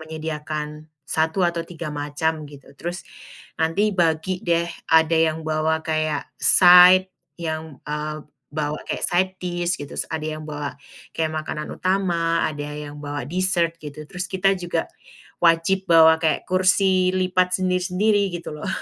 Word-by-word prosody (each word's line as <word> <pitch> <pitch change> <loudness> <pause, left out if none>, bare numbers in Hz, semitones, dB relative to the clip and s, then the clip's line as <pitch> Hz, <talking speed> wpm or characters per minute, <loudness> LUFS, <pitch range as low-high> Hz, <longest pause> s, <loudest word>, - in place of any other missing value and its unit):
menyediakan 155 -1 -6 0.2
1 160 +3 0
atau 170 -1 0
3 165 -2 -7
macam 150 +1 -2
gitu, 140 -1 -15
terus 175 +5 -6 0.6
nanti 180 +7 +1
bagi 175 0 0
deh, 170 -1 +1 0.2
ada 160 0 +4
yang 160 -1 +1
bawa 160 0 0
kayak 155 -2 -1 0.2
side, 180 +1 +7 0.2
yang, 160 -3 -5
eee, 150 +1 -4 0.4
bawa 150 0 -2
kayak - - -2
side 185 +2 +1
dish 175 -1 -2
gitu, 145 - -4
ada 160 -1 -3
yang 155 - -8
bawa 150 -1 -5 0.4
kayak 160 -1 -1
makanan 155 0 -4
utama, 170 -3 0
ada 145 -1 -5
yang 150 0 -7
bawa 145 -2 -5
dessert 175 -1 +1
gitu, 150 0 -9
terus 180 -1 -4
kita 190 +1 +2
juga 175 -2 -2 0.6
wajib 170 +3 +3
bawa 160 -1 +7
kayak 160 -1 +1
kursi 185 0 +3
lipat 185 0 +1
sendiri-sendiri 185 +3 +1
gitu 170 -2 -6
loh. 150 - -6
165 Hz, 140 wpm, -22 LUFS, 155-180 Hz, 0.6 s, side